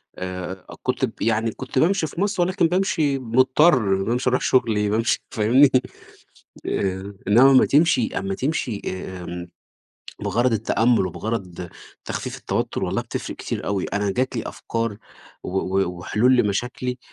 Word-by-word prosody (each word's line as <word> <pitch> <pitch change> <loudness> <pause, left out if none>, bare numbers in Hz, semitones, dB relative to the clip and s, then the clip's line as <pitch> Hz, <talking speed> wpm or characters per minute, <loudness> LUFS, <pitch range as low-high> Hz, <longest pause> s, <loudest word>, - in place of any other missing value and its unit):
آآ 90 0 -6 0.2
كُنت - - 0
ب - - -7
يعني 115 +1 +1
كٌنت 130 +2 -3
بامشي 170 0 +2
في 170 - -6
مصر 200 -3 0
ولكن 180 -1 +2
بامشي 160 -6 +1
مُضطر 125 - +3
بامشي 125 +4 0
أروح 125 - +1
شغلي 105 -5 +2
بامشي 110 +2 +1
فاهمني، 120 +6 +5 1.0
آآ 95 +1 -2
إنّما 125 +6 +7
أمّا 130 - +6
تمشي 170 - +3
أمّا 195 0 -3
تمشي 130 - -2
آآ 95 -1 -5
امم، 85 0 -6 0.7
بِغرض 120 0 +1
التأمل 115 -1 +2
وبِغرض 90 -2 -5 0.4
تخفيف - - -4
التوتّر - - -2
والله - - -1
بتفرق - - -6
كتير - - -5
أوي 100 -2 -1
أنا 100 0 -1
جات 130 +4 -1
لي 115 - -1
أفكار 115 -2 -3 0.5
و - - -6 0.3
و 90 -1 -4
وحلول 120 +8 +2
لمشاكلي 125 +3 -1
115 Hz, 145 wpm, -22 LUFS, 100-135 Hz, 1.0 s, إنّما